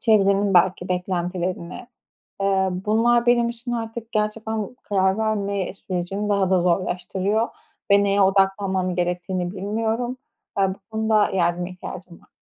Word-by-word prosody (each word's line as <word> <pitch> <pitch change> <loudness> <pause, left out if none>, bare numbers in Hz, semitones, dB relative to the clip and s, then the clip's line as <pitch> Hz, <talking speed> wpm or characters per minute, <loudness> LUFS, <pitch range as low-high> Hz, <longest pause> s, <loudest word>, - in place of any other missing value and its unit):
çevrenin 200 -3 +3
belki 180 0 +3
beklentileri 180 -1 -2
ne, 185 - -9 0.6
ııı, 190 -1 +2 0.2
bunlar 235 +3 +3
benim 240 -1 +4
için 240 +1 -6
artık 230 0 -4
gerçekten 215 +1 -2
karar 190 -1 +1
verme 200 -4 -1
sürecini 195 +2 -3
daha 200 -2 +2
da 185 -2 +3
zorlaştırıyor 185 +4 0 0.4
ve 200 0 +6
neye 200 0 +2
odaklanmam 190 -1 +2
gerektiğini 180 0 -1
bilmiyorum. 225 +5 -2 0.4
Eee, 195 -1 +3
bu 190 - -6
konuda 220 -1 +2
yardıma 175 -1 0
ihtiyacım 180 -1 -9
var. - - -25
195 Hz, 130 wpm, -23 LUFS, 185-220 Hz, 0.6 s, ve